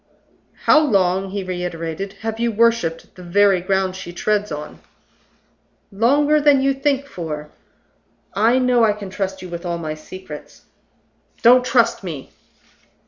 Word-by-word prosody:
"How 310 - +7
long," 195 -9 +1
he 200 0 -4
reiterated, 180 +1 -4
"have 225 0 -4
you 235 0 +1
worshipped 225 -7 +1
the 180 - -13
very 195 +1 +3
ground 190 0 0
she 185 -2 -7
treads 210 +3 -1
on?" 150 0 -7 1.1
"Longer 285 +9 +3
than 290 -2 +5
you 275 +1 +2
think 275 0 0
for. 155 - -6 0.8
I 225 +5 +3
know 250 -2 +3
I 215 -2 +4
can 205 -2 -8
trust 190 -1 -4
you 185 - -8
with 170 0 -6
all 170 -1 -2
my 155 -2 -4
secrets 155 0 -11 0.4
" - - -38
"Don't 250 +2 +7
trust 235 -4 +2
me!" 155 -7 -7
195 Hz, 145 wpm, -20 LUFS, 175-235 Hz, 1.1 s, How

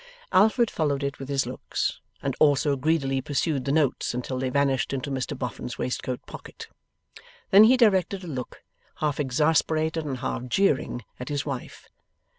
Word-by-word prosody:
Alfred 220 +4 +4
followed 145 -3 0
it 140 +1 -3
with 135 0 -7
his 135 -1 +1
looks, - - -3 0.2
and 135 -1 -1
also 145 -1 +4
greedily 135 -2 0
pursued 145 -1 -1
the 140 - 0
notes 145 -5 +1
until 125 +1 -3
they 130 0 -1
vanished 140 -1 +1
into 135 +1 -3
Mr 135 +1 -3
Boffin's 125 -1 -5
waistcoat 125 0 -3
pocket. - - -10 0.8
Then 205 +2 +9
he 255 +3 +6
directed 195 -4 +3
a - - -7
look, 130 -6 -6 0.3
half 150 -2 -1
exasperated 155 +3 +1
and 140 -3 -3
half 125 +1 -3
jeering, 135 - +1 0.2
at 125 - -6
his 145 -1 -2
wife. 140 -4 -6
140 Hz, 160 wpm, -26 LUFS, 130-160 Hz, 0.8 s, Then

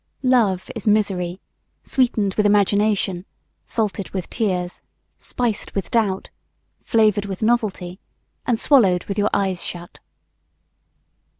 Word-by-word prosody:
Love 225 -8 +2
is 225 -1 -6
misery 190 -4 +1 0.4
sweetened 220 -7 +1
with 210 - +1
imagination, 205 -2 +2 0.4
salted 210 -4 -2
with 185 -3 -5
tears, 185 -6 -2 0.4
spiced 235 -4 -3
with 195 -3 -3
doubt, 205 -5 0 0.5
flavored 215 -2 +2
with 195 +1 -5
novelty, 210 -6 0 0.5
and 235 -3 +1
swallowed 195 - +4
with 200 +1 -3
your 205 - +2
eyes 190 -3 0
shut. 175 -1 -7
205 Hz, 110 wpm, -21 LUFS, 185-220 Hz, 0.5 s, swallowed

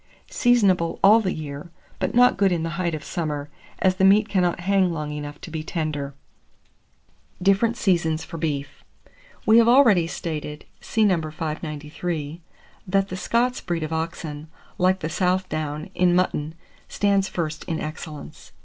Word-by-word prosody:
Seasonable 200 - +3
all 210 +3 +8
the 190 -4 -1
year, 150 0 -6 0.3
but - - -2
not 250 +1 +6
good 195 -1 +2
in 170 -2 0
the 165 - -2
height 170 -3 0
of 150 - -7
summer, 150 -3 -4 0.3
as 185 -1 +2
the 190 - +1
meat 205 +2 +5
cannot 180 -4 0
hang 190 0 +2
long 155 -2 -4
enough 145 0 -6
to 165 - -9
be 160 -1 -3
tender. 155 -4 -3 1.2
DIFFERENT 195 +5 +2
SEASONS 170 -9 +1
FOR 165 -1 -8
BEEF. 145 -3 -3 0.6
We 220 +2 +7
have 230 - +5
already 235 -9 +5
stated 150 -3 -5
(see 220 -1 +1
No. 185 -5 +3
593) 155 +1 -5 0.5
that 195 +1 +1
the 185 - -4
Scots 235 +7 0
breed 170 -3 -2
of 155 +1 -4
oxen, 160 -2 -4 0.3
like 185 +1 +2
the 155 - -2
South 185 +2 0
down 155 +3 -4
in 180 -1 +3
mutton, 160 -4 0 0.3
stands 200 -1 +1
first 160 -4 -4
in 165 -3 -3
excellence. 155 -1 -8
170 Hz, 160 wpm, -23 LUFS, 155-195 Hz, 1.2 s, all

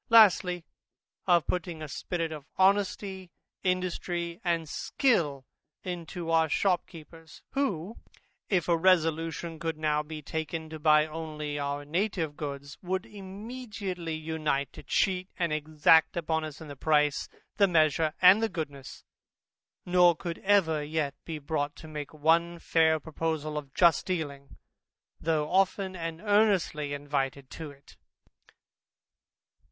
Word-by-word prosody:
Lastly, 185 -6 +5 0.6
of 175 -3 +4
putting 175 -2 -3
a - - -5
spirit 165 +2 -3
of 150 -2 -8
honesty, 190 -1 +1 0.3
industry, 180 -1 -2
and 170 -3 0
skill 150 - 0 0.4
into 175 -1 -5
our 160 -1 +3
shopkeepers, 165 -3 -2
who, 225 - -2 0.5
if 180 -5 +1
a 170 - +4
resolution 165 -1 +1
could 165 -1 -3
now 150 -1 +1
be 155 0 -8
taken 160 +1 -4
to 155 - -6
buy 150 0 +5
only 155 -2 -5
our 145 0 -3
native 165 -1 -1
goods, 140 0 -6
would 185 +1 -2
immediately 200 -4 -6
unite 155 -3 -2
to - - -10
cheat 185 +5 0
and 170 -3 0
exact 155 +2 +4
upon 160 -1 0
us 150 -2 -8
in 160 - -9
the 145 - -8
price, 150 0 +2 0.3
the 200 -2 +5
measure, 155 -2 +2
and 185 +4 +8
the 225 - +1
goodness, 145 -7 -6 0.8
nor 175 -1 +5
could 170 +1 -5
ever 180 -7 +3
yet 150 -2 -1
be 165 -2 -4
brought 145 0 -2
to 160 - -11
make 150 -2 -6
one 165 +3 +2
fair 160 -1 +3
proposal 155 0 -3
of 145 -2 -5
just 170 -4 +4
dealing, 145 -6 -4 0.6
though 155 -2 0
often 190 0 +1
and 165 -1 -5
earnestly 205 -8 +2
invited 140 -2 -3
to 160 -2 -7
it. 140 -1 -17
160 Hz, 130 wpm, -29 LUFS, 150-180 Hz, 0.8 s, and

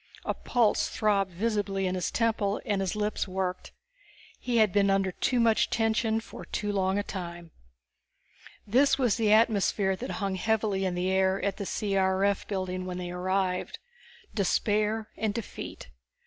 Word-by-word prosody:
A - - 0
pulse 235 -4 +1
throbbed 200 -3 +1
visibly 195 0 -1
in 185 - 0
his 185 -1 -1
temple 220 -3 0
and 205 -2 0
his 190 0 -1
lips 210 -1 -1
worked. 185 -1 -3 0.7
He 245 -2 -1
had 215 -4 +4
been 200 -1 +3
under 195 -1 +2
too 250 +7 0
much 230 -2 +3
tension 225 0 +1
for 225 - -10
too 205 -1 -3
long 190 -1 +1
a 205 - 0
time. 175 -4 -7 1.1
This 260 +7 +3
was 245 -6 +2
the 220 -3 +2
atmosphere 210 -3 +3
that 245 +7 -6
hung 200 -2 -1
heavily 205 0 0
in 180 -1 -1
the 180 +1 0
air 190 0 +2
at 200 -1 -1
the 200 - -4
C.R.F. 195 -1 +1
building 185 -2 -3
when 180 -1 -4
they 180 -1 -5
arrived. 185 +1 -1 0.6
Despair 210 +2 0
and 215 -2 -1
defeat. 205 - -7
200 Hz, 160 wpm, -28 LUFS, 190-220 Hz, 1.1 s, had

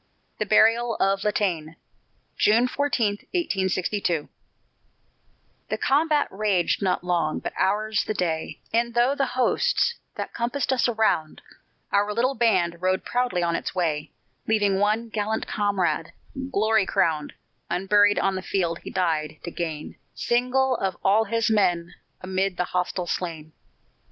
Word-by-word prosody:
THE 215 - -1
BURIAL 230 +2 +4
OF 195 0 +1
LATANÉ 180 -7 -1 0.6
[June 230 +4 +4
14, 250 -7 0 0.2
1862] 190 - 0 1.4
The - - -1
combat 295 +1 +2
raged 195 -3 +1
not 185 -2 0
long, 175 -3 0
but - - -5
ours 210 +2 +1
the 215 - -3
day; 165 -4 -2
And, 235 +1 +1
through 250 +4 +3
the 275 - +1
hosts 480 - +2 0.2
that - - -5
compassed 245 +3 -1
us 250 -1 +2
around, 215 -9 0 0.5
Our 205 +1 +1
little 250 +4 +2
band 190 -8 +2
rode 185 0 0
proudly 245 -8 0
on 170 -1 +1
its - - -4
way, 155 -4 -1 0.4
Leaving 205 -3 +2
one 215 +3 +1
gallant 220 0 -2
comrade, 195 -5 -1 0.4
glory 215 -1 +2
crowned, 155 -4 0 0.4
Unburied 205 +3 +3
on 195 - +1
the 185 - -3
field 175 -3 -1
he - - -9
died 155 -4 -1
to 170 - -5
gain 160 -3 -5 0.2
Single 255 +2 +1
of 190 -1 -2
all 210 +3 +4
his 230 +1 0
men, 175 -5 +1 0.3
amid 190 0 -1
the - - +1
hostile 180 0 -2
slain. 165 -3 -4
200 Hz, 135 wpm, -25 LUFS, 175-230 Hz, 1.4 s, BURIAL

